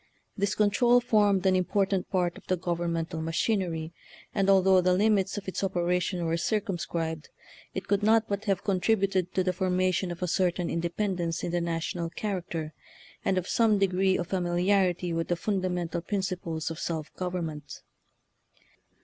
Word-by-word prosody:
This 200 -2 0
control 235 +4 +4
formed 205 -5 +2
an 190 -1 +4
important 190 +1 0
part 180 -2 0
of - - -14
the 185 - +1
governmental 170 -2 -2
machinery, 165 -1 -1 0.4
and 195 -1 +1
al 195 -1 +6
though 190 -1 +5
the 180 0 +3
limits 200 -1 +2
of 200 - -6
its 190 - -3
operation 180 -1 0
were 165 0 0
circumscribed, 170 -6 -2 0.5
it 190 - -4
could 200 0 +2
not 220 +1 +4
but 200 +1 -3
have 195 -3 0
con 195 -3 +1
tributed 195 -3 +1
to 185 - +1
the 185 0 0
formation 185 0 0
of 175 +1 -5
a - - 0
certain 180 0 0
in 170 - -1
dependence 175 -1 -2
in 175 - -2
the 175 0 0
national 170 0 -2
character, 170 -5 -4 0.5
and 190 - +1
of 185 - -1
some 225 -3 +3
degree 190 -1 +2
of 175 - -2
familiarity 180 -1 +1
with 165 0 -1
the 175 - +1
fun 195 +3 -1
damental 175 -2 -2
principles 180 -5 -3
of 165 - -6
self 160 -2 -4
government. 170 -5 -4
185 Hz, 165 wpm, -28 LUFS, 170-195 Hz, 0.5 s, al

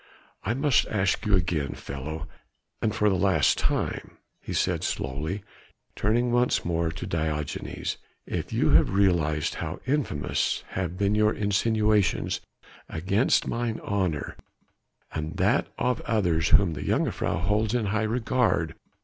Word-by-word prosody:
"I 115 - 0
must 140 -1 +3
ask 100 0 0
you 100 - +5
again, 85 -6 0
fellow 80 +4 -6 0.5
and 110 -1 0
for 105 -1 +2
the 100 - +4
last 90 -6 +3
time," - - -2 0.2
he - - -7
said - - 0
slowly 75 +9 -3 0.5
turning 120 +4 +1
once 120 +1 +2
more 85 -1 0
to - - -6
Diogenes, 75 -2 -3 0.3
"if - - -4
you - - +2
have 75 +3 +5
realized 85 -6 +2
how 80 -1 -4
infamous 130 - 0
have 90 -1 -3
been 100 +1 +2
your 105 0 +3
insinuations 105 -1 +1 0.5
against 100 - +2
mine 115 -1 -2
honour, 90 -8 -2 0.7
and 80 0 -4
that - - +2
of 125 -1 0
others 90 -8 +1
whom 95 -5 +5
the - - -6
jongejuffrouw - - 0
holds 105 +2 +1
in 120 -3 +1
high 105 +2 0
regard? 115 -6 +1
100 Hz, 135 wpm, -26 LUFS, 80-110 Hz, 0.7 s, you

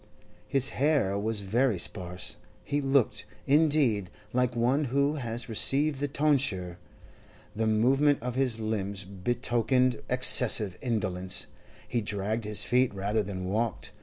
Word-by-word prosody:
His 135 -1 +2
hair 140 -9 +1
was 105 +1 -1
very 115 +3 +1
sparse; 90 0 -4 0.3
he 145 0 -1
looked, 135 -6 +1 0.2
indeed, 140 - +3 0.2
like 125 -1 +1
one 130 +6 +1
who 140 +4 0
has 120 -3 -3
received 135 +6 +2
the 145 - -1
tonsure. 135 - 0 0.8
The 110 +1 0
movement 135 +7 +3
of 125 0 -3
his 125 -3 +1
limbs 100 -3 -3
betokened 120 +5 0
excessive 125 -6 +3
indolence; 95 -6 -1 0.4
he 120 - -1
dragged 105 +2 -2
his 105 -1 +1
feet 125 0 +2
rather 100 +3 0
than 95 -2 -5
walked. 110 +2 -2
115 Hz, 130 wpm, -28 LUFS, 100-135 Hz, 0.8 s, indeed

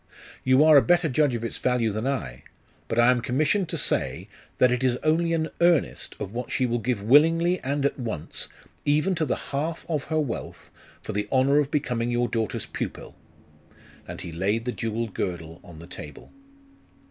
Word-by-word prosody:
'You 130 +3 +5
are 155 -1 +8
a - - +8
better 175 +1 +3
judge 145 -2 +2
of 115 - -4
its 115 - -4
value 125 -3 +1
than 110 +5 -3
I. 65 - -3 0.5
But 115 - -3
I 120 +1 +6
am 125 -1 +1
commissioned 155 - +1
to - - -3
say, - - -1 0.3
that 125 - +4
it 125 +1 0
is 125 -1 +2
only 165 +2 +2
an 160 -1 0
earnest 170 -4 +2
of 100 - -5
what 120 +1 -4
she 130 - 0
will 120 0 0
give 115 -3 -2
willingly 165 - +4
and 140 +1 -1
at 140 - 0
once, 110 -11 -5 0.4
even 150 +6 +2
to 160 -3 0
the - - +1 0.2
half 155 +4 -2
of 155 -4 -2
her 155 -1 0
wealth, 145 -6 -5 0.3
for - - -5
the 105 +1 -2
honour 135 +2 +4
of 145 -2 0
becoming 125 -6 -1
your 120 0 +1
daughter's 115 -1 -2
pupil.' - - -6 0.9
And - - -7
he 90 - -7
laid 100 +7 -1
the 125 - -1
jewelled 115 -2 -3
girdle 80 -2 -4
on 85 -3 -13
the 80 - -10
table. 75 -4 -10
125 Hz, 195 wpm, -25 LUFS, 115-150 Hz, 0.9 s, are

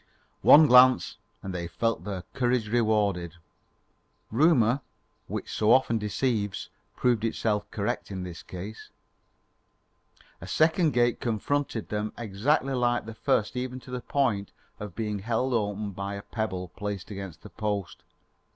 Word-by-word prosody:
One 155 +2 +9
glance 125 -1 +6 0.3
and 95 - -5
they 85 -1 -3
felt 115 +7 -1
their 95 -3 -4
courage 125 -3 +1
rewarded. 105 -7 +1 1.0
Rumour, 135 -1 +4 0.5
which - - -4
so 110 +1 +2
often 120 -3 +4
deceives, 105 -1 -1 0.3
proved 120 -3 +1
itself 110 -2 -1
correct - - -3
in 95 -2 -5
this 85 -4 -7
case. 95 +4 -8 1.5
A - - -8
second 160 -1 +3
gate 120 0 +2
confronted 120 +1 -2
them 105 0 -2
exactly 120 +6 0
like 120 -2 +1
the 115 - -7
first 115 -1 0
even 125 0 -3
to 125 - -12
the 125 -1 -3
point 115 -10 0 0.3
of 105 -4 -7
being 105 -2 -2
held 120 +5 -1
open 105 -2 -1
by 100 +1 -5
a 100 - -7
pebble 95 -5 -3
placed 100 +1 -5
against 95 -6 -7
the - - -11
post. 105 -4 -3
110 Hz, 140 wpm, -27 LUFS, 100-125 Hz, 1.5 s, One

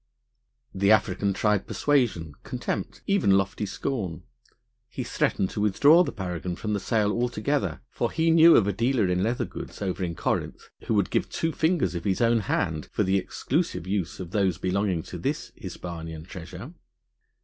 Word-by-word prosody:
The 100 +1 +1
African 100 -2 +2
tried 105 0 +1
persuasion, 120 - +1
contempt, - - -4
even 170 - +3
lofty 100 +1 -1
scorn; 95 - -3 0.7
he - - -4
threatened 95 - 0
to 105 - -3
withdraw 145 - +6
the 145 - -3
paragon 90 -2 -4
from 105 +3 -3
the 100 - 0
sale 105 +1 +1
altogether, 120 - -1
for - - -1
he 165 0 +2
knew 165 +1 +8
of 105 - +5
a 100 - 0
dealer 115 0 +1
in 90 0 +1
leather 115 +5 0
goods - - -8
over 95 -1 -2
in 85 -2 -3
Corinth - - -2 0.2
who 110 - +1
would 100 -3 +1
give - - 0
two 165 - -1
fingers 160 - +1
of 85 0 -5
his 95 -2 +1
own 115 0 +3
hand 80 -6 -1
for - - +1
the 95 0 +2
exclusive 85 - -2
use 95 -2 -2
of 90 -2 -7
those 95 -5 +1
belonging 95 -2 0
to - - -8
this - - -3
Hispanian 80 -2 -7
treasure. 90 - -9
100 Hz, 170 wpm, -26 LUFS, 90-115 Hz, 0.7 s, knew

